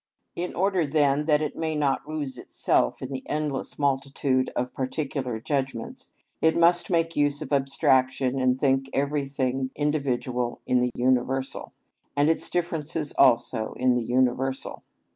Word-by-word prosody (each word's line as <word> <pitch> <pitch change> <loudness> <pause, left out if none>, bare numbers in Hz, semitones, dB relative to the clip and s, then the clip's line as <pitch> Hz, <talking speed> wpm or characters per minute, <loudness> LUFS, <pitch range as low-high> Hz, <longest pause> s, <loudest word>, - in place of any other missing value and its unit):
In 175 +1 -4
order 185 -3 +1
then 145 0 +2
that 150 -1 +3
it 150 - -3
may 160 -1 -2
not 145 0 0
lose 145 -4 -4
itself - - 0
in 130 - -5
the 130 -1 -4
endless 150 -3 -2
multitude 135 -1 0
of 125 +1 -2
particular 130 -3 -3
judgments, 135 -2 -3 0.3
it 160 +1 +3
must 175 +1 +4
make 165 -2 +1
use 145 -1 +2
of - - -5
abstraction 135 -1 +2
and 130 0 +2
think 135 -1 +1
everything 135 -2 -1
individual 130 -5 -1
in 125 - +2
the 125 0 +1
universal, 130 +1 0 0.5
and 145 +2 +4
its 165 - -2
differences 165 -3 -2
also 115 -2 +3
in 125 0 +2
the 125 - +1
universal. 130 +2 0
135 Hz, 145 wpm, -26 LUFS, 130-150 Hz, 0.5 s, must